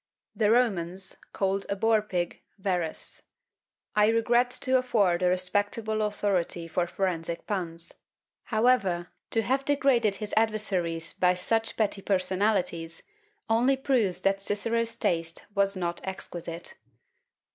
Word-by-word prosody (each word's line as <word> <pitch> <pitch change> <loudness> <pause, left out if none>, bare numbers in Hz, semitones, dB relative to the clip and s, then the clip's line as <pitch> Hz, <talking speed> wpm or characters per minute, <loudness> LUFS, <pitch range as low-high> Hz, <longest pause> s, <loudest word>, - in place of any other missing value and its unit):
The 210 -2 +2
Romans 195 -6 +3 0.2
called 195 0 -1
a 200 - 0
boar 220 +1 +3
pig 180 -4 -3 0.2
Verres. 180 -5 -2 0.7
I 210 0 +5
regret 240 +2 +3
to 260 0 +3
afford 205 -9 +2
a 180 - +3
respectable 205 +4 0
authority 195 -5 -1
for 175 +2 -1
forensic 170 -3 -2
puns; 170 -4 -2 0.5
however, 215 -7 +2 0.2
to 225 - +1
have 265 +4 0
degraded 270 -7 +2
his 210 0 -6
adversaries 190 -7 0
by 180 0 +2
such 225 +5 0
petty 205 -2 0
personalities, 185 -3 0 0.4
only 245 +4 +3
proves 230 -10 +1
that 195 +1 +1
Cicero's 230 +3 +1
taste 165 -5 -1
was 200 -1 +3
not 175 -1 -2
exquisite. 175 -3 -6
200 Hz, 120 wpm, -27 LUFS, 180-225 Hz, 0.7 s, I